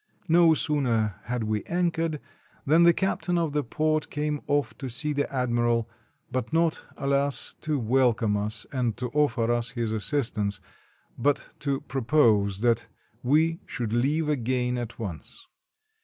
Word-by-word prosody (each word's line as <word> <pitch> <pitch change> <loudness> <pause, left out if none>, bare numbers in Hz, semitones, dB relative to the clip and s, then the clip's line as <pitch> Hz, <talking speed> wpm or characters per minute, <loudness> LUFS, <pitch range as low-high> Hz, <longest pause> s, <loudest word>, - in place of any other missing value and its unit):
No 165 -1 +5
sooner 120 -10 0
had 120 -1 -2
we 110 -1 -1
anchored 165 -3 0 0.5
than 160 +4 +5
the 170 0 +8
captain 180 0 -1
of 165 -3 0
the 150 -1 +1
port 155 +5 0
came 150 0 -2
off 145 0 0
to 135 - -4
see 150 +6 -1
the 145 0 -1
admiral, 120 -3 +1 0.4
but 130 0 -2
not 165 0 +1
— - - -25
alas! 140 -1 +1
— - - -41
to 155 -2 -1
welcome 120 -3 +2
us 105 +1 -2
and 125 -5 -1
to 125 -1 -3
offer 120 -6 +1
us 120 0 0
his 115 -3 -3
assistance, 110 -4 -1 0.6
but 145 +4 +1
to 140 -2 -1
propose 110 -7 +2
that 115 -1 +2 0.3
we 160 +6 +2
should 115 -3 -3
leave 145 +6 +1
again 125 -3 0
at 120 -2 -5
once. 105 - -7
130 Hz, 155 wpm, -26 LUFS, 115-150 Hz, 0.6 s, the